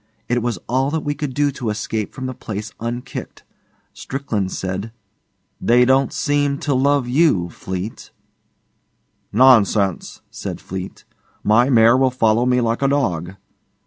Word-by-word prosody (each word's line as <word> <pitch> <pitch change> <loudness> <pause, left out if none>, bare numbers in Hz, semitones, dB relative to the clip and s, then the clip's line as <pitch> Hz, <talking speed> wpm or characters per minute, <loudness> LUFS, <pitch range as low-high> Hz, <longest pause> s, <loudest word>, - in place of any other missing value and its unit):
It 120 0 0
was 120 -3 -2
all 130 +3 +1
that 160 +1 -1
we 145 - -1
could 145 -1 -4
do 145 -1 +2
to 125 -4 -4
escape 105 0 -3
from 130 - -7
the 130 - -3
place 110 -2 -6
unkicked. 120 +2 -6 0.5
Strickland 110 -9 -3
said, 95 +4 -4 0.7
'They 125 +1 +4
don't 135 +1 +3
seem 145 -1 0
to 145 -1 0
love 140 0 +2
you, 125 - +2
Fleete.' 95 +6 -6 1.2
'Nonsense,' 105 -6 +3
said - - -6
Fleete; 95 0 -7 0.4
'my 120 +5 +4
mare 115 -2 +6
will 130 0 +3
follow 120 -1 +2
me 125 0 +3
like 115 +1 -1
a 135 - +3
dog. 95 - -1
120 Hz, 145 wpm, -20 LUFS, 105-135 Hz, 1.2 s, mare